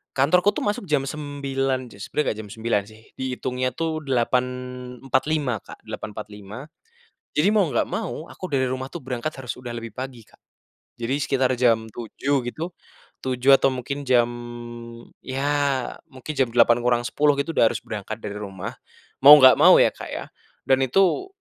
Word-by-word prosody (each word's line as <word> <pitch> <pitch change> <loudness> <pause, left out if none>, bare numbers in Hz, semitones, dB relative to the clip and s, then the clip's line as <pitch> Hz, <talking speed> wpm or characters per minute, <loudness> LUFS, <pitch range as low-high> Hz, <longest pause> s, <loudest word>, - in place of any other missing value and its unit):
Kantorku 180 +9 +3
tuh - - -2
masuk 205 -1 -1
jam 150 -3 +1
9.00, 135 -3 -3
ces 100 -1 -9
sebenernya 150 - -1
nggak 105 - -6
jam 105 -1 -8
9.00 110 -2 0
sih 110 +1 -15 0.2
diitungnya 130 0 -2
tuh 160 -2 -3
8:45 125 +2 -1
Kak, - - -13
8:45. 105 0 -8 0.7
Jadi 150 +6 +3
mau 210 -2 +4
nggak 120 - +1
mau 150 +7 -4
aku - - -11
dari 130 -2 +2
rumah 130 +1 -4
tuh 170 - -5
berangkat 130 +3 -4
harus 125 -2 -5
udah 125 -1 -8
lebih 115 -2 -7
pagi, 125 -3 -7
Kak. - - -25 0.6
Jadi 120 +2 -2
sekitar 135 -3 +1
jam 115 -3 +3
7.00 135 +4 -1
gitu, 160 +8 -5 0.8
atau 135 - +5
mungkin 135 +2 -5
jam, 120 -2 +4 0.9
ya 135 +1 -4 0.6
mungkin 130 0 -8
jam 135 -3 +2
7:50 120 +4 +3
gitu, 140 +4 -1
udah 115 - +4
harus - - -5
berangkat 110 0 -5
dari 100 - -4
rumah, 95 -3 -6 0.5
mau 145 +3 +11
nggak 130 -3 +8
mau - - +8
ya, - - +5
Kak, - - -9
ya. - - -5 0.4
Dan 130 0 +3
itu, 195 - +2
130 Hz, 155 wpm, -23 LUFS, 120-140 Hz, 0.9 s, mau